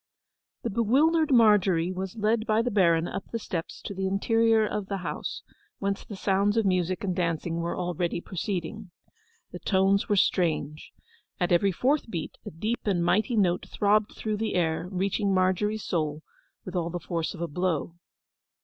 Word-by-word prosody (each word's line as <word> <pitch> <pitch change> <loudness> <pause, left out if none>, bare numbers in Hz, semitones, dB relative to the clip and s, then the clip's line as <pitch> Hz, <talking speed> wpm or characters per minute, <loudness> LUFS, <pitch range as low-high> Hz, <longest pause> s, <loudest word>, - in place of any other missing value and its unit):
The 235 - -2
bewildered 290 +9 +3
Margery 195 -7 +4
was 190 +1 -5
led 220 +1 0
by 220 +1 +3
the 245 - -1
Baron 170 -5 +3
up - - -5
the 230 - -2
steps 170 -6 -5
to - - -5
the 190 0 -2
interior 225 +3 +3
of 210 -2 -3
the 195 - -2
house, - - -4 0.3
whence 200 0 -2
the 205 - -8
sounds 200 +2 +1
of 225 - +2
music 185 -1 0
and 185 -2 -1
dancing 165 -1 -1
were 170 0 -2
already 175 -1 -1
proceeding. 190 +3 -4 0.6
The - - -7
tones 195 0 +2
were 205 - +3
strange. 160 -5 0 0.5
At 175 - 0
every 185 +3 +4
fourth 260 - 0
beat 170 -6 -5
a - - -6
deep 215 +9 -2
and 175 -4 +1
mighty 215 +7 +2
note 180 -3 +2
throbbed 210 +1 +2
through 215 -1 -2
the 220 -1 -2
air, 165 -1 0
reaching 195 +1 0
Margery's 190 +3 +1
soul 155 -2 -2 0.4
with 185 - -7
all 170 -1 0
the 175 +1 -4
force 165 +1 -3
of 170 - -9
a 170 - -1
blow. 170 0 -1
190 Hz, 175 wpm, -27 LUFS, 175-215 Hz, 0.6 s, Margery